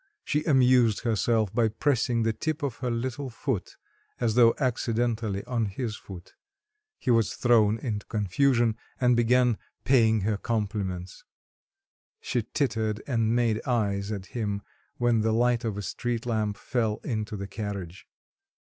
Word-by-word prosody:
She 150 0 0
amused 125 -6 +4
herself 110 -2 +1
by 115 -1 +3
pressing 120 0 +1
the 110 0 +1
tip 155 +4 -3
of 135 -5 -2
her 125 - -2
little 130 +3 -3
foot 120 -4 -4 0.4
as 115 -3 +1
though 115 0 +5
accidentally 115 -5 -1
on 120 -2 0
his 110 +2 -4
foot; 95 -4 -11 0.6
he 125 - 0
was 115 -2 +2
thrown 110 -3 +4
into 110 -3 -4
confusion 115 +3 +2 0.2
and 125 -1 +4
began 120 0 +3 0.2
paying 110 -5 +4
her 105 +1 0
compliments. 100 -5 -3 1.0
She 120 - -1
tittered 110 -7 -1
and 115 -3 +1
made 115 -2 +1
eyes 100 -4 0
at 100 -3 -4
him 105 -4 -2 0.3
when 120 -2 +2
the 110 +1 +1
light 120 +1 +2
of 110 -3 -2
a 105 - -4
street 120 +4 -3
lamp 110 -3 -1
fell 110 -4 -1
into 110 -4 -3
the 100 - -4
carriage. 100 -5 -6
115 Hz, 145 wpm, -27 LUFS, 105-120 Hz, 1.0 s, though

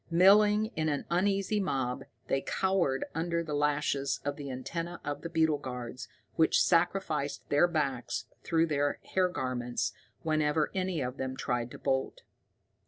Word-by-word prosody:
Milling 210 +5 +5
in 155 0 0
an 145 -1 -2
uneasy 195 +3 +1
mob, 135 -7 -1 0.2
they 135 - +1
cowered 185 -9 +1
under 170 +1 -1
the 155 -2 -5
lashes 145 -2 +1
of 145 0 -1
the 140 -1 -7
antenna 165 +7 -4
of 145 0 -3
the 170 - -5
beetle 160 -3 +2
guards, 125 -3 -6 0.3
which 160 - +4
sacrificed 165 -4 +1
their 145 +4 +5
backs 140 -7 -1 0.2
through 165 -1 +2
their 145 -2 0
hair 185 -1 +3
garments 120 -6 -2 0.3
whenever 155 -1 +1
any 185 -4 -1
of 125 +1 -3
them 130 0 -3
tried 120 -1 -1
to - - -9
bolt. 135 -1 -1
150 Hz, 150 wpm, -30 LUFS, 135-175 Hz, 0.3 s, Milling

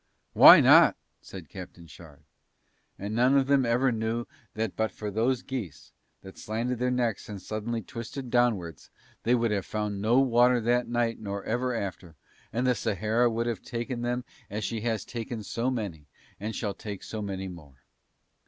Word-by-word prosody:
"Why - - +10
not?" - - +7 0.3
said 90 -5 -10
Captain 90 0 -10
Shard. 80 -2 -15 0.7
And 100 +2 -5
none 125 +4 +4
of 135 - +3
them 135 -2 +3
ever 125 +3 +2
knew 115 +1 -2 0.3
that 110 -2 -2
but 110 0 0
for 105 -1 -6
those 120 +5 0
geese, 105 - -6 0.3
that 95 0 -12
slanted 115 +3 -3
their 125 0 +1
necks 120 -5 -1
and 105 -2 -6
suddenly 110 +4 -4
twisted 120 +5 -7
downwards, 100 - 0 0.3
they 120 +2 +3
would 115 -2 +1
have 100 -2 0
found 105 -2 -3
no 115 +5 +4
water 125 -1 +4
that 120 +2 +1
night 120 -1 -1
nor 100 -2 -5
ever 125 +2 -1
after, 90 -5 -5 0.4
and 120 +3 -1
the 125 - +4
Sahara 110 +3 +1
would 115 +1 -1
have 115 -5 -2
taken 120 0 -4
them 125 +1 -2 0.2
as 105 +2 -4
she 115 -2 -3
has 110 -3 -2
taken 115 -1 -5
so 115 +5 -2
many 100 - -4 0.3
and 110 +2 -4
shall 105 -4 -2
take 100 0 -8
so 110 - -5
many 95 -2 -4
more. 75 -8 -12
115 Hz, 175 wpm, -28 LUFS, 100-120 Hz, 0.7 s, Why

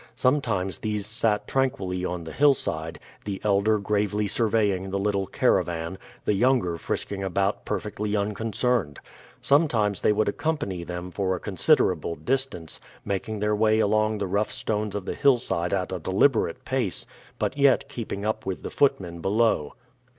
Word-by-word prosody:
Sometimes 115 -9 +1
these 105 -2 -2
sat 105 -1 +1
tranquilly 100 -9 -1
on 90 -1 -3
the 80 - -7
hillside, 95 - +1 0.3
the 100 -2 -4
elder 105 +1 +3
gravely 105 0 0
surveying 100 -4 +1
the 100 - -1
little 100 -1 0
caravan, 85 +2 0 0.3
the - - +2
younger 100 -6 +2
frisking 100 +3 -3
about 95 +2 -1
perfectly 105 0 -2
unconcerned. 105 - -1 0.4
Sometimes 120 - +2
they - - +4
would 105 +1 +1
accompany 145 - -2
them 90 +1 -6
for 95 +1 0
a - - -5
considerable 95 - +2
distance, 130 -11 -2 0.2
making 100 +2 -3
their 105 0 +2
way 110 +1 +3
along 110 0 +2
the 100 - -2
rough 100 +3 0
stones 105 -1 -2
of 100 -3 -4
the - - -2
hillside 120 -10 +2
at 95 -2 -1
a 95 - -3
deliberate 95 - +1
pace, 125 -8 -1 0.3
but - - -1
yet 140 -1 +4
keeping 110 -6 -5
up 110 0 -1
with 95 -1 -4
the - - -5
footmen 95 -12 +1
below. 100 -5 +1
105 Hz, 150 wpm, -26 LUFS, 95-115 Hz, 0.4 s, they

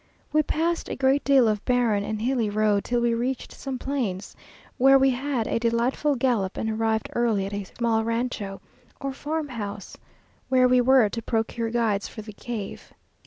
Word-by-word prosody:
We 305 - +5
passed 330 +3 -1
a - - -3
great 270 +1 +2
deal 270 -4 +5
of 210 -2 0
barren 235 -5 +2
and 215 +1 -3
hilly 245 -3 +1
road, 210 -1 +1
till 240 0 0
we 235 -1 +2
reached 245 +3 -2
some 270 -2 -5
plains, 240 -9 -3 0.4
where 270 +2 +7
we 270 0 +4
had 255 -2 -1
a - - -1
delightful 240 +5 +1
gallop, 235 -7 0
and 220 - -1
arrived 220 0 -1
early 225 -5 +1
at 200 - -6
a 200 -1 -3
small 225 +2 0
rancho, 230 -4 -3 0.4
or 275 -1 -3
farmhouse, 255 -10 -5 0.5
where 255 -1 +5
we 250 0 +4
were 255 -2 +5
to 230 - -4
procure 225 0 -1
guides 225 -4 0
for 215 - -9
the 210 0 -10
cave. 215 -2 -7
235 Hz, 175 wpm, -25 LUFS, 215-265 Hz, 0.5 s, where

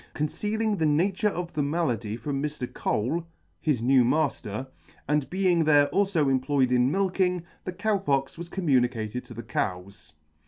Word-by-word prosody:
Concealing 210 +8 -1
the 160 - +1
nature 185 +7 +2
of 175 -3 -5
the 155 - 0
malady 125 -8 -1
from 135 +4 -3
Mr. 150 -3 -3
Cole, 155 +11 -1 0.3
his 140 -8 0
new 130 0 +5
matter, 130 -4 0 0.4
and 150 -1 0
being 180 -3 +2
there 145 -2 +5
alfo 195 -7 +2
employed 135 0 +2
in 125 0 +3
milking, 185 0 +1 0.2
the 185 - -2
Cow 205 +2 0
Pox 135 -7 0
was 170 +1 -8
communicated 125 - 0
to 120 - -11
the 115 - -6
cows. 95 +1 -4
150 Hz, 155 wpm, -26 LUFS, 125-180 Hz, 0.4 s, new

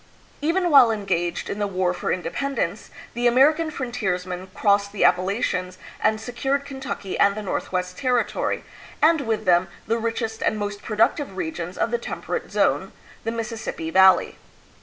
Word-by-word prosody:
Even 345 +3 +1
while 270 -5 +8
engaged 185 -5 -1
in 205 - -4
the 205 - 0
War 185 -2 0
for - - -3
Independence, 265 +11 -2 0.2
the 240 0 +1
American 300 +7 +4
frontiersman 190 -10 -3
crossed 200 0 +2
the 205 - -1
Appalachians 185 -1 +1 0.2
and 215 0 +2
se 225 +3 -7
cured 275 +3 -1
Kentucky 265 -8 -5
and 200 0 +4
the 215 - -5
Northwest 180 -1 -3
Territory, 250 -3 0 0.4
and 315 0 +4
with 220 -4 -2
them 175 0 +4 0.2
the 230 +2 0
richest 225 -1 -3
and 215 - +1
most 205 0 -4
productive 215 0 0
regions 170 +1 -4
of 230 - 0
the 240 - 0
Temperate - - -4
Zone, - - +1 0.3
the 225 - 0
Mississippi 225 -8 -4
Valley. 190 0 +5
215 Hz, 155 wpm, -23 LUFS, 185-245 Hz, 0.4 s, while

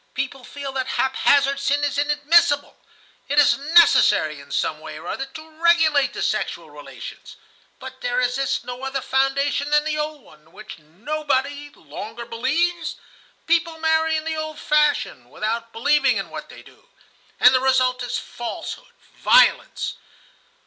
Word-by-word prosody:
People 270 -1 -4
feel 280 +2 -7
that 260 -1 -3
haphazard 275 +1 +2
sin 285 +1 0
is 285 -1 0
inadmissible. 295 0 +2 0.5
It 290 - -1
is 295 - +6
necessary 330 +5 +4
in - - -14
some - - -1
way - - -9
or - - -11
other 270 - -4
to 315 +3 -12
regulate 310 -5 +3
the - - -4
sexual - - -3
relations; - - -11 0.4
but 260 0 -11
there 245 0 -1
exists 255 +2 -1
no 250 0 -7
other 270 0 -2
foundation 275 +2 0
than 295 0 +3
the 305 0 -2
old 300 -2 -4
one, 155 - -19
in 160 +1 -26
which 215 -5 -11
nobody 285 - -3
longer 220 - -9
believes? 315 +9 -1 0.5
People 335 -1 +1
marry 320 0 +1
in 310 - -4
the 320 0 -3
old 310 -1 -5
fashion, 295 - 0
without 230 - -4
believing 280 +4 +2
in - - -5
what - - -8
they - - -13
do, - - -21 0.5
and 250 - +7
the 255 - +3
result 255 -1 +2
is 245 - -3
falsehood, 240 -1 -7 0.2
violence. - - +3
280 Hz, 155 wpm, -22 LUFS, 255-305 Hz, 0.5 s, and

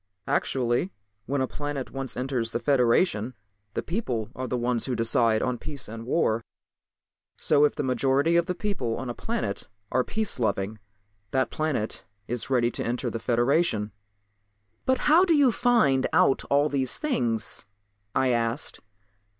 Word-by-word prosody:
"Actually, 125 +7 0 0.4
when 140 +1 0
a 130 - +1
planet 145 -2 -4
once 135 -2 -5
enters 125 -3 -1
the 120 - -2
Federation 125 - +2 0.4
the - - -1
people 125 - -3
are 130 0 -4
the 125 - -1
ones 120 -1 0
to 130 - -1
decide 115 -1 +3
on 125 -2 -1
peace 145 -3 -5
and 115 +2 -8
war. 115 -6 +1 0.9
So 145 - +4
if 150 - 0
the - - -2
majority 135 +5 +2
of 170 +1 +3
the 180 - -1
people 175 - -2
on 130 -2 -4
a - - -4
planet 220 - -3 0.2
are 130 - +2
peace 220 -4 -2
loving 105 -1 -1 0.5
that 130 +3 0
planet 150 -9 -2 0.2
is 120 +1 -3
ready 120 -2 +2
to - - -3
enter 120 0 -2
the 115 - -3
Federation." 120 -1 +1 1.0
"But 260 0 +2
how 320 +4 +6
do 340 -4 +4
you 280 -4 +5
find 220 - +3
out 135 - +3
all 145 +1 +3
these 135 -4 0
things?" 120 - -1 0.5
I 130 - +3
asked. 115 +2 0
130 Hz, 160 wpm, -26 LUFS, 115-150 Hz, 1.0 s, how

